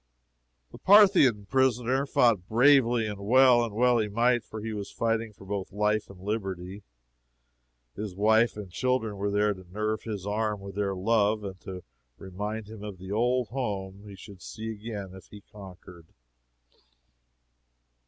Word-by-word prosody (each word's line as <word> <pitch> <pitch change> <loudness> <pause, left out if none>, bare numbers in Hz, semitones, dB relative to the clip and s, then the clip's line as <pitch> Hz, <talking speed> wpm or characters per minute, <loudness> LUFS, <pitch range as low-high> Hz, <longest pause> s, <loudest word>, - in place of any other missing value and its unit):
The - - -12
Parthian 185 - +5
prisoner 130 +2 +1
fought 110 -9 +2
bravely 120 -1 +4
and 105 -2 -5
well; 125 +3 +5
and 110 -3 -5
well 125 +1 +3
he 110 - 0
might, 120 +3 +1
for 110 - -9
he 110 +1 -5
was 100 -2 -5
fighting 115 -1 -1
for 100 -2 -16
both 100 -1 -4
life 105 +1 0
and 100 -2 -13
liberty. 95 -1 -5 1.1
His 105 -3 -6
wife 110 +3 +3
and 100 -4 -8
children 120 -1 -1
were 100 +1 -2
there 105 +1 +1
to 95 -1 -13
nerve 105 +2 -2
his 105 -4 -6
arm 105 0 -1
with 100 0 -9
their 100 0 -2
love, 105 +2 +1
and 95 -2 -7
to 90 -2 -8 0.3
remind 105 +3 -6
him 110 -1 -10
of 105 -3 -7
the 95 +2 -9
old 120 +2 0
home 100 -6 -4
he 100 - -10
should 95 0 -13
see 110 0 -7
again 105 -3 -7
if 95 - -13
he 105 - -13
conquered. 90 -4 -13
105 Hz, 160 wpm, -27 LUFS, 100-115 Hz, 1.1 s, Parthian